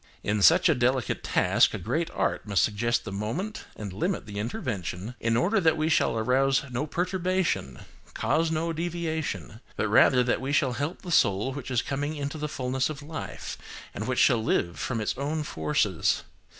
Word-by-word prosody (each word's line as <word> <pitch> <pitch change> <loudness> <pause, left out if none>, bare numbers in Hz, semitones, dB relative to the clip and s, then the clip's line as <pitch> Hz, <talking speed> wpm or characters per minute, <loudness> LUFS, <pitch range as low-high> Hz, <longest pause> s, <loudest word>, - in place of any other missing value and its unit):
In 105 0 0
such 165 - +6
a 160 - +5
delicate 125 -1 0
task, - - +3
a - - -2
great - - -1
art - - -1
must 100 -5 +3
suggest 120 +3 0
the 100 - -5
moment, 135 - -4
and 100 -3 -6
limit 175 - -2
the 105 -1 -6
intervention, 105 - -4
in 115 0 +1
order 195 - +2
that 160 -4 +3
we 155 +1 +1
shall 130 - +2
arouse 135 +4 +2
no 130 +5 -2
perturbation, 180 - -1 0.4
cause 160 +1 +1
no 165 +1 -1
deviation, 160 - -3
but - - 0
rather 125 -1 +5
that 120 - 0
we 135 +1 -2
shall 135 -3 +2
help 145 +7 -4
the 180 - -6
soul 105 - +3
which 135 -2 -6
is 125 -3 +1
coming 145 +3 -2
into 145 +1 -4
the 150 0 -3
fulness 130 0 -1
of 145 -2 -7
life, 155 +2 -6 0.3
and - - -4
which - - -1
shall 115 -2 +4
live 85 -5 0
from 120 -3 -2
its 110 - -1
own 150 +2 -1
forces. 105 - 0
135 Hz, 185 wpm, -27 LUFS, 110-160 Hz, 0.4 s, such